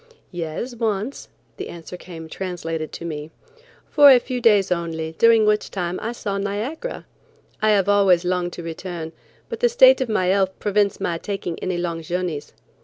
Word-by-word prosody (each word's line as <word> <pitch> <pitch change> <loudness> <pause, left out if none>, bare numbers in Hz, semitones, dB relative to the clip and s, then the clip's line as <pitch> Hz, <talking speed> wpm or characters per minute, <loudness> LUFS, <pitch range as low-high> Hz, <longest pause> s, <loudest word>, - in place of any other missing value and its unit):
"Yes, 175 +8 -4
once;" 225 +2 -2 0.3
the - - -6
answer 170 +1 -9
came 170 -2 -10
translated 165 -3 -5
to 170 - -7
me. 150 -2 -5 0.6
"For 290 -2 +8
a 260 - +9
few 250 0 -3
days 205 -5 +4
only, 165 -2 -2
during 230 -1 +6
which 210 0 +1
time 180 -2 -3
I 230 - -3
saw 200 -4 -3
Niagara. 215 - -4 0.6
I 215 - +3
have 200 -3 +3
always 195 -4 +4
longed 180 -1 -1
to 175 - -7
return, 165 0 -6 0.4
but - - -6
the 485 - +3
state - - +6
of 255 - -1
my 215 -4 +1
health 190 0 +1
prevents 205 -1 +1
my 170 -1 -2
taking 190 -4 -4
any 185 -1 -2
long 170 -1 -3
journeys. 175 -2 -3
185 Hz, 175 wpm, -22 LUFS, 170-215 Hz, 0.6 s, a